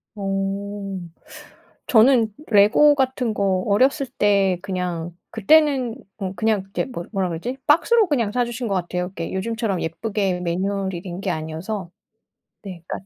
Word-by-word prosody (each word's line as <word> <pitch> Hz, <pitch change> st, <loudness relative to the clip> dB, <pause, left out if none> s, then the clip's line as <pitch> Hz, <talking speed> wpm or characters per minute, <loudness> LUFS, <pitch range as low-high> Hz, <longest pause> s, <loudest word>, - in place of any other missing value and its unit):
어. 195 Hz, 0 st, -3 dB, 0.9 s
저는 230 Hz, -2 st, +5 dB, 0.2 s
레고 215 Hz, +9 st, +6 dB
같은 260 Hz, -4 st, 0 dB
거 190 Hz, -3 st, 0 dB
어렸을 265 Hz, +7 st, +2 dB
때 200 Hz, -6 st, +2 dB
그냥 180 Hz, -3 st, -3 dB, 0.2 s
그때는 265 Hz, 0 st, +3 dB, 0.2 s
어 190 Hz, -2 st, -3 dB
그냥 215 Hz, +1 st, +1 dB
그렇게 195 Hz, +1 st, -3 dB
뭐 175 Hz, -10 st, -7 dB
뭐라 190 Hz, -2 st, 0 dB
그러지? 205 Hz, +11 st, -4 dB
박스로 420 Hz, +8 st, +4 dB
그냥 240 Hz, -10 st, 0 dB
사 245 Hz, +2 st, +1 dB
주신 240 Hz, 0 st, -4 dB
것 200 Hz, -, -1 dB
같아요. 180 Hz, 0 st, -2 dB
이렇게 180 Hz, -2 st, -6 dB
요즘처럼 210 Hz, -1 st, -2 dB
예쁘게 190 Hz, +1 st, -2 dB
매뉴얼이 190 Hz, +1 st, -2 dB
된 180 Hz, 0 st, -6 dB
게 195 Hz, -, -2 dB
아니어서. 165 Hz, +5 st, -5 dB, 0.7 s
네. 185 Hz, -4 st, -9 dB
그러니까 195 Hz, -, -6 dB
200 Hz, 305 characters per minute, -22 LUFS, 185-235 Hz, 0.9 s, 레고